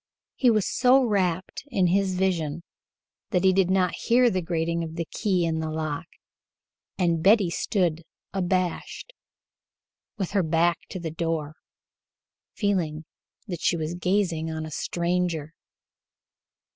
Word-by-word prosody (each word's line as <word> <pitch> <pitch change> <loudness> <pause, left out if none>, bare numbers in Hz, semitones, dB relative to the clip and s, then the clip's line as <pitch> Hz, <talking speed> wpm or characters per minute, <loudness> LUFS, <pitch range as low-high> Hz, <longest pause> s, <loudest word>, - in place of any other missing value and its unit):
He 250 - +4
was 215 -4 +3
so 260 +2 +4
rapt 185 -5 -1
in 200 -10 +1
his 190 +1 +2
vision 170 -4 -1 0.7
that 180 -1 +1
he 190 -1 +5
did 190 -1 +3
not 185 -2 +2
hear 240 0 +3
the 185 - 0
grating 170 0 -1
of 160 0 -6
the 170 -1 -2
key 185 0 0
in 160 -1 -1
the 160 0 -2
lock, 155 +1 -3 0.9
and 170 -3 +1
Betty 195 -1 +5
stood 170 -4 0 0.3
abashed, 185 - -2 1.0
with 190 -4 -3
her 200 -1 +2
back 170 +1 +2
to 185 - -5
the 165 -2 -4
door, 160 -2 -2 1.0
feeling 170 -7 -1 0.4
that 175 -6 -5
she 170 - +2
was 160 +1 -3
gazing 175 -3 0
on 160 0 -4
a 155 - -8
stranger. 170 -1 -1
175 Hz, 135 wpm, -26 LUFS, 165-190 Hz, 1.0 s, he